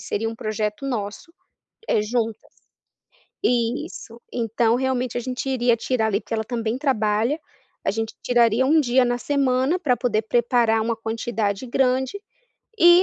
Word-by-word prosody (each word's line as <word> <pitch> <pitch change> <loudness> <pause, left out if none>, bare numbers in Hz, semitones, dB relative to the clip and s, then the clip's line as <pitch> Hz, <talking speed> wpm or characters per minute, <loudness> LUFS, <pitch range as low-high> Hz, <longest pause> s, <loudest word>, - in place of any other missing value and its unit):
Seria 225 +2 -2
um 225 - -5
projeto 215 +2 -3
nosso, 225 - -4 0.6
eh, 210 - +2
juntas, 225 0 -2 0.9
isso. 240 - -1
Então 230 0 +1
realmente 255 -1 -1
a 245 - 0
gente 255 +2 -4
iria 245 -3 +2
tirar 230 -1 0
ali, 205 0 +1
porque - - -5
ela 220 0 -1
também 230 0 -2
trabalha, 235 0 +1 0.5
a - - +2
gente 225 +2 -3
tiraria 240 0 +3
1 315 +3 +5
dia 255 -2 +3
na 245 - +1
semana 270 +4 +1
para 255 -9 +1
poder 225 -4 0
preparar 235 0 +2
uma 230 0 -1
quantidade 225 -1 -2
grande, 260 +7 +1 0.6
e, 345 0 +8
240 Hz, 145 wpm, -23 LUFS, 225-260 Hz, 0.9 s, e